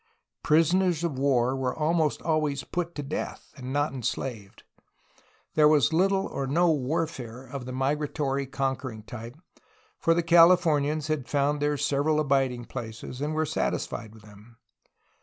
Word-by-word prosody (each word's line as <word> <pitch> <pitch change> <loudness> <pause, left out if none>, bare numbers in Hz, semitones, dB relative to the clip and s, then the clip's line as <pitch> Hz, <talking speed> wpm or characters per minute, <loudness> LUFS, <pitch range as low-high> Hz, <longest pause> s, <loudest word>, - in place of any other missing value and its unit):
Prisoners 170 +2 +3
of 150 -6 -2
war 130 -2 +2
were 130 -2 -2
almost 160 -1 +1
always 155 -4 0
put 175 -1 -4
to 145 - -4
death, 140 +2 -5
and 130 -2 -7
not 145 +1 0
enslaved. 120 -4 -5 0.9
There 150 -1 +5
was 150 -1 +4
little 195 +3 +2
or 135 -7 -4
no 170 +5 +3
warfare 135 -4 -3
of 130 -2 -7
the - - -5
migratory 140 +1 -1
conquering 135 -4 -3
type, 115 +4 -9 0.6
for 165 - +3
the 170 - +1
Cahfornians 165 -3 +4
had 155 -4 -2
found 145 +1 +1
their 145 0 +1
several 145 +3 +1
abiding 135 -4 +1
places 120 +1 -7
and 150 +1 -2
were 155 0 +1
satisfied 110 -6 -3
with 110 - -16
them. 105 +3 -17
140 Hz, 145 wpm, -27 LUFS, 130-155 Hz, 0.9 s, There